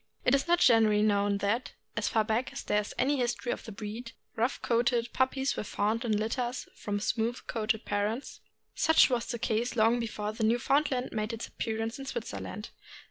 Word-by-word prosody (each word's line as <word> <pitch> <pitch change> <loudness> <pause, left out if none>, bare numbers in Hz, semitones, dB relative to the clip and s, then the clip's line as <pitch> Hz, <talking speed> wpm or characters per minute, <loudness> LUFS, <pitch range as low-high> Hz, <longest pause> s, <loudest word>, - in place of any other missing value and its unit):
It 250 - +4
is 275 +3 +2
not 345 +1 +4
generally 220 -8 +5
known 205 -1 +2
that, 230 +5 0 0.2
as 225 - 0
far 220 - +2
back 220 +4 -1
as - - -6
there 210 0 +2
is 205 - -8
any 280 +3 +2
history 240 -1 -1
of - - -5
the 225 - -7
breed, 220 +3 -7 0.2
rough 230 +3 0
coaled 235 0 +3 0.2
puppies 265 +1 +1
were - - -3
found 215 +3 -1
in 220 -3 +1
litters 240 +3 -2
from 205 -1 -3
smooth 225 +3 -1
coated 220 -1 -1
parents. 210 +6 -2 0.3
Such 320 -4 +5
was 240 -2 0
the 235 - -3
case 230 +2 -1
long 230 +1 +4
before 210 -2 -3
the 220 0 -3
Newfoundland 255 +3 +2
made 215 0 -2
its 230 - -5
appearance 225 +2 -3
in 270 - -6
Switzerland. 230 -4 -5
230 Hz, 190 wpm, -30 LUFS, 215-245 Hz, 0.3 s, generally